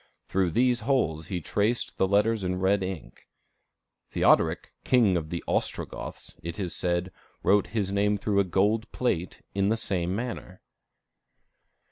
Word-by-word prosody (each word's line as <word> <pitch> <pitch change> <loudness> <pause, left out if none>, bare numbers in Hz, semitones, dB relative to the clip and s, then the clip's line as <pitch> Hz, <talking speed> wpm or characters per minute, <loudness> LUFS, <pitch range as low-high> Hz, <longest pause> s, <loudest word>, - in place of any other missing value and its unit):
Through 95 -2 +1
these 120 +6 +2
holes 110 - 0
he 90 - -2
traced 105 +8 -1
the 95 - +3
letters 105 +2 +2
in 90 0 -1
red 95 +1 +2
ink. 95 -4 -6 0.8
Theodoric, - - +2
King 115 -7 +4
of 80 -3 -2
the 85 0 -4
Ostrogoths, - - -3
it 85 0 -6
is 90 -4 -3
said, 90 +1 -1 0.3
wrote 100 +1 +4
his 100 -3 -2
name 105 +1 +2
through 100 0 0
a - - +5
gold 105 +5 +1
plate, 90 -9 -2
in 100 0 +1
the 110 - +2
same 90 -4 0
manner. 115 -5 -6
100 Hz, 145 wpm, -27 LUFS, 90-110 Hz, 0.8 s, a